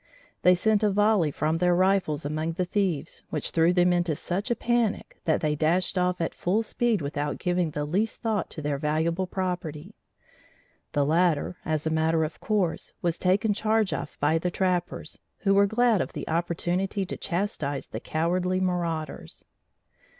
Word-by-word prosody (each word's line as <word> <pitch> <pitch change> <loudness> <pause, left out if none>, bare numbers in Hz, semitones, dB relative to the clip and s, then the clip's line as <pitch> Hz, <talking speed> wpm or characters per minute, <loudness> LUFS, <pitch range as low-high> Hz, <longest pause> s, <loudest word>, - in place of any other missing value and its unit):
They 180 0 +6
sent 210 +3 +2
a 210 - +3
volley 205 -4 +3
from 155 +3 0
their 180 +1 +3
rifles 185 -5 +2
among 155 +2 -2
the 180 +2 -1
thieves, 180 -5 -1
which - - -3
threw 165 +1 +4
them 180 0 +4
into 175 -3 +1
such 190 - -3
a 240 - +2
panic 235 -2 -1
that 160 - +2
they 150 -1 +1
dashed 165 +6 +1
off 180 0 +1
at 165 - -1
full 205 +6 0
speed 225 -5 0
without 145 +1 -2
giving 175 -2 0
the 150 -1 -3
least 200 +9 -1
thought 220 -4 -1
to 155 - -8
their 145 -1 -1
valuable 165 +4 0
property. 180 -2 -4 1.0
The 145 -2 +2
latter 170 +1 +2
as 155 -1 -1
a 160 - 0
matter 160 0 +2
of 155 - -5
course 200 -6 -1
was 170 -1 0
taken 205 +4 +2
charge 215 -1 +1
of - - -5
by 155 +3 +2
the 180 - -1
trappers, 180 -3 -2 0.2
who 195 -1 +3
were 200 0 +5
glad 225 -1 +3
of - - -4
the - - -6
opportunity 175 +4 -1
to 185 - -5
chastise 170 -7 -2
the - - -6
cowardly 180 +3 0
marauders. 170 -4 -3
180 Hz, 170 wpm, -26 LUFS, 160-195 Hz, 1.0 s, They